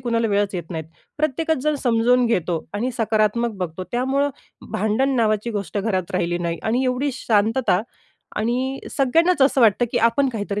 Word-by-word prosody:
कुणाला 230 -2 0
वेळच 200 -1 0
येत 175 -1 -5
नाही. 160 -2 -4 0.3
प्रत्येकच 310 +1 0
जण 305 0 +1
समजावून 245 0 +3
घेतो 175 -7 -1
आणि 240 +5 -1
सकारात्मक 220 +1 +1
बघतो. 180 0 -4
त्यामुळं 270 +3 +1 0.4
भांडण 220 +7 +1
नावाची 215 0 +1
गोष्ट 205 -1 -3
घरात 190 -4 -1
राहिली 175 -1 0
नाही 170 -1 -2
आणि 245 +4 0
एवढी 255 +3 0
शांतता 220 -3 +1 0.5
आणि 255 +5 -1
सगळ्यांनाच 325 +5 +2
असं 270 -1 +3
वाटतं, 225 +1 +4
की 240 - +2
आपण 265 +4 +3
काहीतरी 210 -3 -3
230 Hz, 160 wpm, -22 LUFS, 205-260 Hz, 0.5 s, वाटतं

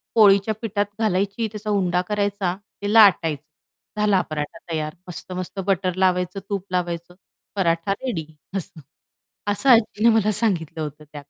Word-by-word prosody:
पोळीच्या 205 0 +5
पिठात 205 -2 0
घालायची, 200 +1 0
त्याचा 210 0 -6
उंडा 180 -3 +1
करायचा, 200 -3 -1 0.3
ते 205 +1 -1
लाटायचं, 165 -9 +5 0.6
झाला 205 -3 +3
पराठा 150 +1 -4
तयार 155 -1 -3
मस्त-मस्त 185 +2 -6
बटर 185 -2 +1
लावायचं, 185 0 +1
तूप 200 -2 -2
लावायचं, 175 -1 -3 0.4
पराठा 170 -1 +1
रेडी 205 -8 -4 0.3
असं. 170 -3 -7 0.7
असं 235 +7 -1
आजीने 230 -1 +4
मला 215 -1 +3
सांगितलं 175 -8 0
होतं 150 0 -7
त्यात. 145 -1 -9
190 Hz, 135 wpm, -23 LUFS, 170-210 Hz, 0.7 s, पोळीच्या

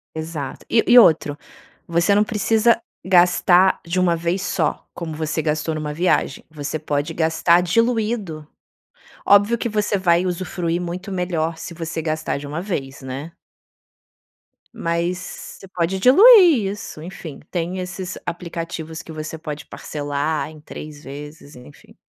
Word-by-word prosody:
Exato. 160 -4 -6
E 225 - +4
e 245 - +7
outro, 150 -6 +4 0.5
você 170 +4 +2
não 210 - +5
precisa 220 +1 +2 0.3
gastar 180 0 +4
de 175 +2 -1
uma 175 -2 +3
vez 170 +3 -1
só, 200 - -1
como 160 -3 -6
você 155 0 -2
gastou 155 +1 -1
numa 150 -1 -4
viagem, 170 -4 0
você 155 0 -4
pode 150 +1 -2
gastar 165 +2 +3
diluído. 215 -5 0 0.8
Óbvio 205 +3 +5
que 235 - -2
você 210 -1 0
vai 175 -1 +2
usufruir 175 -1 -2
muito 180 +3 -5
melhor 170 -3 -1
se 175 - -7
você 165 -1 -4
gastar 155 -2 -2
de 145 - -8
uma 150 +3 -4
vez, 140 -8 -5
né? 135 +5 -6 1.4
Mas 170 +2 -1 0.4
você 195 - -12
pode 180 +1 -1
diluir 335 - +7
isso, 205 -7 -8
enfim, 160 -4 -9
tem 175 +1 -3
esses 180 0 -5
aplicativos 165 -2 -5
que 160 - -11
você 155 +1 -6
pode 150 -2 -7
parcelar 145 +1 -3
em 155 -1 -13
3 150 0 -10
vezes, 145 +1 -10
enfim. 125 +3 -16
170 Hz, 140 wpm, -21 LUFS, 155-185 Hz, 1.4 s, e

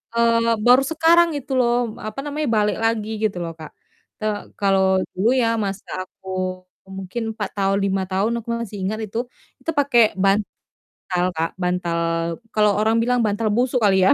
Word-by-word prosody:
eee, 230 0 +3
baru 250 +2 +7
sekarang 335 +2 +5
itu 275 0 -8
loh, 240 -2 +1
apa 215 - -6
namanya, 295 +1 -2
balik 210 0 +1
lagi 220 -1 0
gitu 205 -4 0
loh, 165 -1 -5
Kak. 155 - -8 0.5
Te 215 - -5 0.3
kalau 195 -1 +3 0.3
dulu 195 +5 +1
ya 230 - +2 0.2
masa 195 0 -5 0.2
aku 190 +1 -20 0.7
mungkin 195 +5 -5 0.2
4 205 -2 -3
tahun, 195 0 +1
5 195 -1 0
tahun 195 +4 0
aku 225 - -25
masih 225 -3 -6
ingat 205 +4 -2
itu, 210 +2 -7 0.4
itu - - -5
pakai 275 -4 +4 0.2
bantal 195 +2 +1 0.8
Kak, 165 +1 0
bantal 180 -2 -1 0.6
kalau 210 -1 +4
orang 220 +1 +2
bilang 245 +1 +1
bantal 215 +2 0
busuk 245 +3 +1
kali 190 -3 +4
ya. - - +6
215 Hz, 165 wpm, -22 LUFS, 195-235 Hz, 0.8 s, baru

